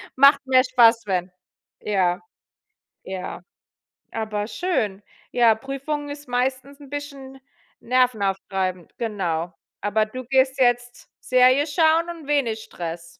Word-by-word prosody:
macht 280 +1 +6
mehr 255 -1 +5
Spaß, 230 -3 +4
wenn. 185 -2 -1 0.5
Ja, 185 -3 +1 0.8
ja, 190 -1 -6 0.7
aber 215 -2 -3
schön. 215 - -2 0.3
Ja, 230 -2 +4
Prüfung 275 +4 -4
ist 285 -2 -9
meistens 260 +3 -2
'n 280 - -12
bisschen 275 -2 -8 0.4
nervenaufreibend, 195 -7 -1
genau. 180 -7 -2 0.3
Aber 215 +1 +1
du 255 +4 -7
gehst 265 +1 +2
jetzt 245 0 0
Serie 255 +3 +4
schauen 325 +2 +3
und 325 -4 -9
wenig 245 -7 +1
Stress. 170 0 -7
245 Hz, 115 wpm, -23 LUFS, 205-275 Hz, 0.8 s, macht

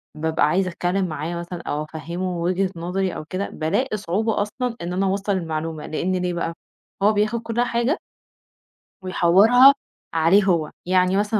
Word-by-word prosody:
بابقى 160 0 +1
عايزة 185 +4 +1
أتكلّم 180 +1 -1
معاه 160 +2 -4
مثلًا 170 0 -6
أو 150 -1 -3
أفَهّمه 170 +4 -4
وِجهة 180 +3 0
نظري 180 +2 -2
أو - - -6
كده 185 +5 -3
بالاقي 205 +10 -1
صعوبة 205 +4 -1
أصلًا 235 +4 -3
إن 175 +1 -4
أنا 190 +2 0
أوَصّل 195 +1 -1
المعلومة 160 -2 -4
لإن 180 +4 -1
ليه 180 -1 -1
بقى؟ 170 -1 -2 0.5
هو 215 +1 +5
بياخد 215 +3 0
كل 230 +1 -1
حاجة 245 +6 0 1.0
ويحوّرها 200 +9 +6 0.4
عليه 165 +5 +4
هو، 170 -5 +1
يعني 185 +1 +3
مثلًا 210 +1 +1
185 Hz, 160 wpm, -22 LUFS, 170-205 Hz, 1.0 s, ويحوّرها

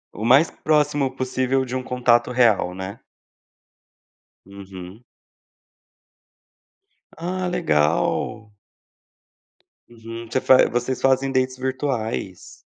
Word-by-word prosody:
O 105 - -6
mais 135 +8 +5
próximo 150 -3 +1
possível 130 0 -1
de 125 0 -5
um 130 - -1
contato 125 -2 +1
real, 115 -7 +2
né. 95 +3 -7 1.5
Uhum. 95 +1 -11 2.1
Ah, 180 +2 -3
legal. 105 - 0 1.4
Uhum. 115 0 -9
Você 130 - +1
faz 130 - +5
vocês 120 +1 -2
fazem 135 0 +2
dates 130 -1 0
virtuais. 130 -7 -4
125 Hz, 90 wpm, -22 LUFS, 110-135 Hz, 2.1 s, mais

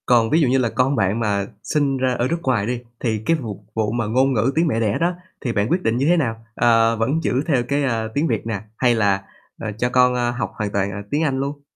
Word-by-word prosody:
Còn 115 -2 +4
ví 160 +6 +3
dụ 145 - +3
như 130 +2 +3
là 125 -3 +1
con 130 +4 +1
bạn 100 0 +1
mà 100 -3 0 0.2
sinh 140 -3 0
ra 130 -1 +1
ở 125 0 0
nước 170 +3 -2
ngoài 115 -6 +1
đi, 120 +1 -2 0.2
thì 110 -3 -1
cái 165 - +3
vụt 110 -5 -5 0.2
vụ 110 -1 0
mà 120 0 -1
ngôn 130 +5 +2
ngữ 120 +3 +2
tiếng 165 +2 +3
mẹ 115 -7 0
đẻ 110 -3 +1
đó, 170 +2 +1 0.3
thì 120 -4 -2
bạn 105 -1 +1
quyết 180 +2 +1
định 115 +1 +1
như 135 - +1
thế 175 +3 +4
nào? 115 -7 -2
Ờ, 115 -1 +4
vẫn 120 +8 0
giữ 130 - +1
theo 135 -7 +2
cái, 140 +2 0
ờ, 115 -4 0
tiếng 150 +3 +1
Việt - - -2
nè, 105 -3 -3 0.2
hay 120 -2 +3
là, 100 -3 +1 0.4
ờ, 110 - -4
cho 125 +2 0
con, 125 0 +4
a, 120 -1 0
học 120 -5 -3
hoàn 105 -2 -3
toàn, 100 0 0
à, 100 0 -5
tiếng 150 +3 +1
Anh 135 -4 0
luôn? 140 +1 -3
120 Hz, 275 wpm, -21 LUFS, 110-135 Hz, 0.4 s, Còn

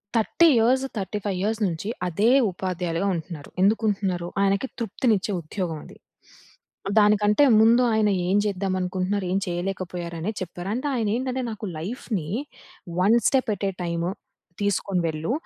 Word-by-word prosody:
30 230 +9 +4
years, 250 +4 +3
35 200 -1 -3
years 220 +2 0
నుంచి 170 +4 -4 0.2
అదే 200 +7 +2 0.2
ఉపాధ్యాయులుగా 180 0 -2
ఉంటున్నారు. 160 -3 -7
ఎందుకు 210 +3 +3
ఉంటున్నారు? 190 -4 -1
ఆయనకి 200 +5 +2
తృప్తినిచ్చే 220 -2 0
ఉద్యోగం 165 0 -4
అది. - - -14 1.0
దానికంటే 210 +4 +4 0.2
ముందు 230 +3 +6
ఆయన 215 -1 +3 0.2
ఏం 190 +3 +3
జెద్దాం 195 -2 -1
అనుకుంటున్నారు. 185 +2 -1
ఏం 195 - +2
చేయలేకపోయారు 175 -1 -4
అనేది 205 +6 -3
చెప్పారు. 175 +1 -5
అంటే 255 +5 -2
ఆయన 225 -3 0
ఏంటంటే 260 +1 -2
నాకు 215 0 -6
లైఫ్‌ని 190 -3 -4 0.7
'one 205 +6 +5
step 265 -4 +2
at 200 - -4
a - - -2
time' 170 -1 -2 0.6
తీసుకొని 200 -2 0
వెళ్ళు. 160 +5 -2
195 Hz, 140 wpm, -24 LUFS, 180-220 Hz, 1.0 s, ముందు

